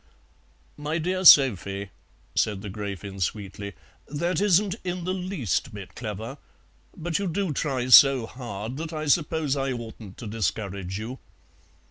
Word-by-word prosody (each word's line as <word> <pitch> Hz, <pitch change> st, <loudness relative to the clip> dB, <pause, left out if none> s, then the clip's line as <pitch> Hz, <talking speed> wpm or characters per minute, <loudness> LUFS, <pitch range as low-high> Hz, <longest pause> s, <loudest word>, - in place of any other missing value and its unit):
"My 150 Hz, +2 st, -2 dB
dear 185 Hz, +3 st, -1 dB
Sophie," 100 Hz, -, +6 dB, 0.4 s
said 105 Hz, -2 st, 0 dB
the 100 Hz, -, -5 dB
Gräfin 100 Hz, -1 st, -6 dB
sweetly, 100 Hz, +1 st, -3 dB, 0.3 s
"that 170 Hz, +6 st, -1 dB
isn't 200 Hz, -1 st, +3 dB
in 180 Hz, -1 st, -3 dB
the 185 Hz, +2 st, -1 dB
least 180 Hz, -, -2 dB
bit 100 Hz, -2 st, -9 dB
clever; 110 Hz, +4 st, -6 dB, 0.6 s
but 165 Hz, +1 st, -2 dB
you 200 Hz, -, -1 dB
do 180 Hz, -1 st, -1 dB
try 135 Hz, -5 st, -1 dB
so 135 Hz, -1 st, +8 dB
hard 120 Hz, -1 st, -6 dB
that 165 Hz, +1 st, -5 dB
I 155 Hz, 0 st, -3 dB
suppose 150 Hz, -1 st, +1 dB
I 135 Hz, -1 st, -1 dB
oughtn't 110 Hz, -4 st, -9 dB
to 120 Hz, -, -8 dB
discourage 100 Hz, -3 st, -3 dB
you. 115 Hz, +5 st, -6 dB
130 Hz, 140 wpm, -26 LUFS, 105-160 Hz, 0.6 s, so